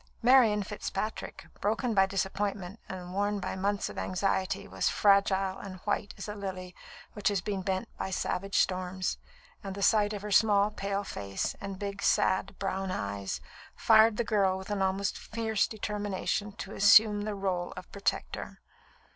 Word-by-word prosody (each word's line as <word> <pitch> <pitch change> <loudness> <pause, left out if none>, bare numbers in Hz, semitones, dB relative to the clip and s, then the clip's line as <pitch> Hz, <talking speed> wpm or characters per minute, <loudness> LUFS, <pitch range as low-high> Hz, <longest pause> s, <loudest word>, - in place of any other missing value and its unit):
Marian 235 -5 +5
Fitzpatrick, 210 +1 -5
broken 220 +4 0
by 195 -2 +4
disappointment, 195 +1 -2
and 180 -1 -7
worn 205 +1 0
by - - -4
months 200 +1 -1
of - - -6
anxiety, 195 +1 -1
was - - 0
fragile 195 -1 +3
and 195 -2 -7
white 205 0 -2
as 195 - -6
a 210 - -4
lily 185 -3 -6 0.4
which 210 - -2
has 205 -2 +2
been 195 +1 -3
bent 190 +4 -2
by 190 - -2
savage 190 +1 -2
storms, 185 0 0 0.4
and 195 -1 -5
the 200 - -3
sight 210 +1 +4
of 205 -1 -5
her 210 - -5
small, 205 0 +4
pale 200 -1 -2
face 100 - -3
and 195 -1 -5
big, 200 0 -5
sad, 190 +1 +2
brown 195 -1 -2
eyes 100 - -3 0.3
fired 220 -1 +5
the 235 - +1
girl 200 -4 +2
with 190 +2 -8
an 205 -1 -1
almost 190 +1 0
fierce 220 -1 -1
determination 210 -1 -2
to 195 - -7
assume 210 0 +6
the 210 -1 -3
rôle 185 -3 -2
of - - -9
protector. 200 0 -3
200 Hz, 165 wpm, -30 LUFS, 190-210 Hz, 0.4 s, assume